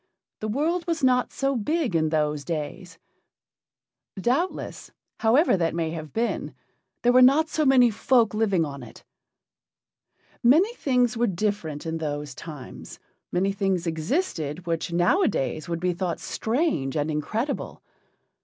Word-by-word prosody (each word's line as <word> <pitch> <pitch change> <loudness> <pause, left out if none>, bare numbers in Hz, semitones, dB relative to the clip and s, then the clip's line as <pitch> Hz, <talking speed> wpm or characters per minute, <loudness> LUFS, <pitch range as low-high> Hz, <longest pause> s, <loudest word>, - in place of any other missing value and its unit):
the 215 - -3
world 320 - -1
was 330 -3 -1
not 250 -1 +3
so 275 0 -1
big 265 - -1
in 155 -1 +2
those 150 -2 0
days; 165 +2 -5 1.2
doubtless, 270 - -1 0.3
however 235 - +4
that 165 -3 0
may 165 -1 -1
have 155 -2 -7
been, 230 +1 -2 0.5
there 245 - +5
were 255 - +7
not 285 +5 +5
so 310 - 0
many 250 -3 +6
folk 235 0 +2
living 200 -6 +1
on 140 -2 -7
it. 120 - -13 1.4
Many 325 - +4
things 250 - +1
were 240 +1 +2
different 175 -6 -2
in 165 0 -3
those 145 -2 -4
times: 145 -3 -10 0.3
many 190 +2 +1
things 195 -3 -1
existed 165 - -2
which 165 0 -2
nowadays 170 - +1
would 170 -1 -2
be 180 +1 0
thought 175 -1 -3
strange 220 - -1
and 150 +1 0
incredible. 220 - -3
195 Hz, 135 wpm, -25 LUFS, 160-255 Hz, 1.4 s, were